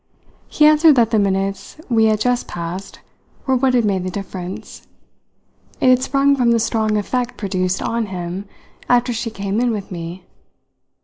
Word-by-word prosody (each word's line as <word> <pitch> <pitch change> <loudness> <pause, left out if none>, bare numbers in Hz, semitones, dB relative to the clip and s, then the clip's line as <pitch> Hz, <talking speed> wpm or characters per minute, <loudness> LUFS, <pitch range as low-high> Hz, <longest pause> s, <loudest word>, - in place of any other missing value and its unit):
He 300 - +3
answered 305 0 +6
that 230 -3 +3
the 220 - +3
minutes 195 +3 -2
we 225 -3 +3
had 215 -1 +2
just 245 +2 0
passed 175 +3 -6 0.4
were 265 - +2
what 255 0 +2
had 240 -3 +3
made 190 -3 0
the 185 - -3
difference; 185 -1 -7 0.9
it 255 - +3
had 255 0 +5
sprung 275 +1 +2
from 245 -3 +2
the 235 0 +3
strong 220 -1 0
effect 245 +4 -2
produced 185 -2 -1
on 230 -1 -1
him 180 +1 -5 0.4
after 245 0 +3
she 230 0 -3
came 200 -1 -3
in 245 0 +2
with 210 -4 -4
me. 170 +1 -7
220 Hz, 170 wpm, -19 LUFS, 190-245 Hz, 0.9 s, answered